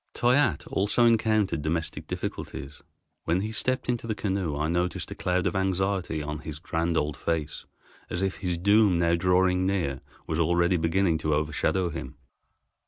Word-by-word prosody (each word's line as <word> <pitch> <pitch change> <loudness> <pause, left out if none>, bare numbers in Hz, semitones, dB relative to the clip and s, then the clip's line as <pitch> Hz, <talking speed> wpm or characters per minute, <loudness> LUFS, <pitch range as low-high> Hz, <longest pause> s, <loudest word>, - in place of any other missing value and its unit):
Toyatte 125 - +2
also 105 +5 +2
encountered 110 -7 +2
domestic 80 +2 -3
difficulties. 70 +2 -6 0.4
When 85 +3 +1
he 110 +2 -3
stepped 130 +3 0
into 120 -2 -1
the 110 - -1
canoe 95 -8 -2
I 75 +1 0
noticed 90 +2 -1
a - - -5
cloud 90 0 0
of - - 0
anxiety 95 -4 0
on 75 0 -4
his 75 -1 -7
grand 85 +1 -1
old 75 -1 0
face, 80 -2 -3 0.4
as 90 - -2
if 95 -1 -1
his 90 -3 -2
doom 100 +1 +4
now 85 0 +2
drawing 90 +1 +2
near 85 -9 -1 0.2
was 80 0 -2
already 85 +2 +3
beginning 80 0 +1
to 80 -2 +1
overshadow 75 +4 0
him. 75 -4 -7
90 Hz, 165 wpm, -27 LUFS, 80-95 Hz, 0.4 s, doom